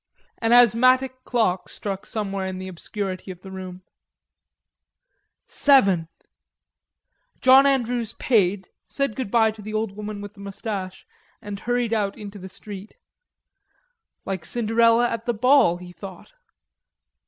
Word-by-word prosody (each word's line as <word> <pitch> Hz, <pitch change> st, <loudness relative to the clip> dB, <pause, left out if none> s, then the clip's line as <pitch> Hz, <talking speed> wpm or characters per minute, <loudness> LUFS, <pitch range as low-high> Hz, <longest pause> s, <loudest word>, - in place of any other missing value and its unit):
An 225 Hz, 0 st, 0 dB
asthmatic 255 Hz, +2 st, +4 dB
clock 215 Hz, -7 st, 0 dB
struck 195 Hz, -1 st, -6 dB
somewhere 195 Hz, -3 st, -3 dB
in 190 Hz, 0 st, -5 dB
the 185 Hz, 0 st, -6 dB
obscurity 185 Hz, +1 st, -5 dB
of 180 Hz, -1 st, -8 dB
the 190 Hz, -, -10 dB
room. 185 Hz, -1 st, -8 dB, 1.6 s
"Seven!" 195 Hz, -, +3 dB, 1.3 s
John 265 Hz, +2 st, +7 dB
Andrews 245 Hz, -4 st, 0 dB
paid, 200 Hz, -5 st, +1 dB, 0.2 s
said 275 Hz, -6 st, -2 dB
good 260 Hz, -6 st, -4 dB
bye 225 Hz, 0 st, +3 dB
to 215 Hz, 0 st, -12 dB
the 215 Hz, +1 st, -6 dB
old 215 Hz, -1 st, -1 dB
woman 210 Hz, +1 st, -7 dB
with 205 Hz, 0 st, -8 dB
the 205 Hz, -, -19 dB
mustache, 200 Hz, -1 st, -6 dB, 0.3 s
and 205 Hz, -2 st, -7 dB
hurried 245 Hz, 0 st, -1 dB
out 205 Hz, -3 st, -1 dB
into 205 Hz, -1 st, -9 dB
the 190 Hz, +1 st, -9 dB
street. 205 Hz, +1 st, -10 dB, 1.3 s
"Like 190 Hz, -4 st, -4 dB
Cinderella 230 Hz, +4 st, +3 dB
at 230 Hz, 0 st, -5 dB
the 240 Hz, -, 0 dB
ball," 250 Hz, -6 st, +4 dB
he 180 Hz, 0 st, -11 dB
thought. 190 Hz, -, -11 dB
210 Hz, 130 wpm, -23 LUFS, 190-235 Hz, 1.6 s, John